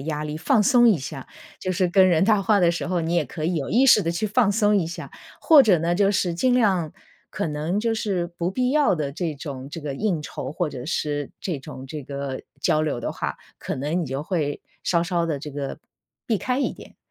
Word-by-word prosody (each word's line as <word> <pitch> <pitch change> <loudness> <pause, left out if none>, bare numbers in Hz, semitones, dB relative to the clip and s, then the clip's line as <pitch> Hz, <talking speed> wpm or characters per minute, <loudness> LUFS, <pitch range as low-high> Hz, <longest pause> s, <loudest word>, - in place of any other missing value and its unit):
压 150 +1 -3
力， 150 0 -4
放 225 - +2
松 240 +2 +5
一 205 -7 +4
下， 135 0 -7 0.3
就 185 - -2
是 185 0 +1
跟 185 +1 +5
人 170 -1 +3
谈 210 -1 +3
话 210 +1 +3
的 175 -3 +4
时 175 - -4
候 180 -1 0
你 165 +1 -1
也 170 -3 +2
可 155 +4 -6
以 175 +3 0
有 140 -5 -2
意 245 +9 +4
识 220 -5 +7
地 165 - -1
去 170 +5 -1
放 215 0 +2
松 210 0 +3
一 190 - +2
下， 165 +2 -7 0.3
或 310 -5 +7
者 200 -7 +4
呢， 170 +2 0
就 200 +2 +3
是 185 -4 0
尽 250 +9 +2
量 190 -10 +2 0.4
可 - - -2
能 155 +5 -2
就 225 +1 0
是 195 -5 -1
不 175 0 -3
必 250 +5 0
要 295 -10 +3
的 145 -3 -3
这 170 0 -2
种， 135 -2 -7
这 165 - -6
个 145 -2 -4
应 185 0 -1
酬 135 -3 -6
或 165 +2 -1
者 125 -4 -7
是 145 -2 -2
这 165 -7 -3
种， 130 0 -9
这 150 +2 -6
个 140 0 -5 0.2
交 155 - +2
流 150 -5 -1
的 120 - -3
话， 70 -1 -4 0.2
可 - - -4
能 150 +7 -1
你 - - -2
就 135 +2 -4
会 155 -5 -2 0.2
稍 170 - +2
稍 175 -1 0
地 160 -4 -2
这 150 +1 -8
个 140 -1 -5 0.5
避 225 - +1
开 250 +7 -1
一 280 - 0
点， - - -14
170 Hz, 260 characters per minute, -24 LUFS, 150-200 Hz, 0.5 s, 识